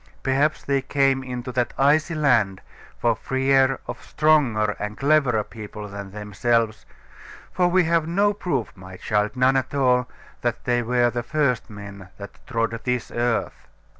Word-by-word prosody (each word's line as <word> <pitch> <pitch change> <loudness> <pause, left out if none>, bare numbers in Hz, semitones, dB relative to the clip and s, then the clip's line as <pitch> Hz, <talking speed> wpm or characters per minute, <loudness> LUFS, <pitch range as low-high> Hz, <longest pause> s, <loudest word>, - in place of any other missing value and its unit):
Perhaps 140 +3 +1
they 140 -1 0
came 135 0 +1
into 125 0 -5
that 120 -1 -1
icy 155 +4 +3
land 120 -11 +2 0.4
for 115 -1 +1
fear 135 +3 +2
of - - -7
stronger 130 -9 +2
and 105 +1 -5
cleverer 140 -6 +2
people 105 -1 -9
than 100 -1 -8
themselves; 105 +2 -1 0.6
for 180 -1 +2
we 180 +1 +3
have 165 -1 +1
no 200 +4 +2
proof, 170 - -2
my 95 -1 -11
child, 105 +4 -1
none 130 +1 +3
at 135 +1 -1
all, 125 -2 +2 0.3
that 120 -1 -2
they 120 0 +1
were 120 0 +2
the 120 - -2
first 140 -2 0
men 100 -2 -10
that 100 0 -10
trod 115 -2 0
this 125 -1 -2
earth. 120 -1 -2
125 Hz, 155 wpm, -23 LUFS, 110-140 Hz, 0.6 s, icy